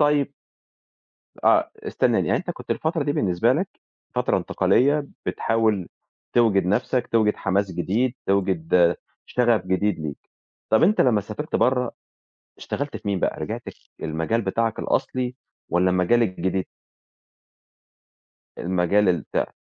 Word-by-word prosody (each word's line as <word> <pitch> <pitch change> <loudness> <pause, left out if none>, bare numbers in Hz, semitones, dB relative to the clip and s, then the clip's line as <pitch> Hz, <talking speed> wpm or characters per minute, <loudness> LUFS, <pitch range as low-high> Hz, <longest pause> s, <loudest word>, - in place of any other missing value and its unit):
طيّب 145 -1 +3 1.1
آه، - - +4
استنانى - - +1
يعني - - +2
أنت - - -5
كنت - - -9
الفترة 160 0 0
دي 145 - 0
بالنسبة 90 -9 +2
لك - - -1 0.5
فترة - - +1
انتقالية، 145 +3 +2 0.2
بتحاول 110 -5 0 0.4
توجِد 105 -6 +3
نَفْسك، 125 +5 +1
توجِد 110 -2 +2
حماس 100 0 0
جديد، 110 +9 0
توجِد 90 -3 +2 0.3
شغف 120 -6 +2
جديد 95 +1 +1
ليك، 75 -3 -5 0.5
طَب 110 - +4
أنت 205 +6 +4
لمّا 115 -5 +4
سافرت 110 +9 -4
برّه، 125 -1 +2 0.7
اشتغلت 145 0 -4
في - - -9
مين 100 -2 0
بقى - - -1
رجَعت - - -4 0.4
للمجال 80 +9 -1
بتاعك 110 +2 -1
الأصلي 125 -1 -1 0.3
والّا 90 +2 +3
المجال 90 +6 +3
الجديد؟ 95 -2 -1 1.9
المجال 95 +3 +2
البتاع. 85 -2 -1
105 Hz, 120 wpm, -23 LUFS, 90-125 Hz, 1.9 s, آه